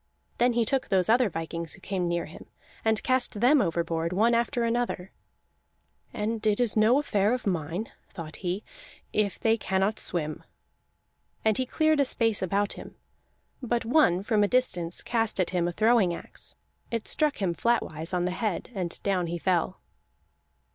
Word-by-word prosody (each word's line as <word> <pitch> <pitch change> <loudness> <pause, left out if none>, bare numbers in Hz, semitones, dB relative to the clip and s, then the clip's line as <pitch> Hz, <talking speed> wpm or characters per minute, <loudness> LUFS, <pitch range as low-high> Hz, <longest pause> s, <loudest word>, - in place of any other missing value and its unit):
Then 245 +1 +4
he 235 -1 +2
took 265 +3 +1
those 185 -1 +2
other 235 0 +4
vikings 165 -1 -4
who - - -13
came 185 -1 -2
near 170 0 -1
him, 155 - -12 0.4
and 220 -1 +1
cast 255 -4 +1
them 260 +5 +5
overboard 170 -2 -1
one 220 +6 +3
after 235 +1 +1
another; 230 -5 -1 1.0
"and 215 +1 -3
it 210 +1 +2
is 240 -4 +1
no 220 +4 +5
affair 215 -6 +2
of 250 - -7
mine," 175 +2 -2 0.2
thought 165 -4 -8
he, 185 +3 -3 0.5
"if 210 -2 +1
they 225 0 +3
cannot 195 +1 0
swim." 155 -3 -2 1.0
And 220 -1 +4
he 255 - 0
cleared 310 +2 +2
a 280 - +4
space 225 -4 0
about 200 +2 0
him, - - -10 0.7
but 240 -2 -1
one 225 - +3
from 210 -1 +2
a - - +3
distance 180 -9 -1
cast 225 -3 -1
at 185 - +1
him 175 -2 +1
a - - -1
throwing 215 -2 +3
axe; - - -11 0.3
it 230 -2 -3
struck 300 -2 +1
him 185 -4 0
flatwise 165 -7 0
on 180 -1 0
the 180 - 0
head, 210 +3 -3
and 180 -5 -4
down 185 -3 0
he 170 +1 -3
fell. 180 +1 0
205 Hz, 170 wpm, -27 LUFS, 175-235 Hz, 1.0 s, them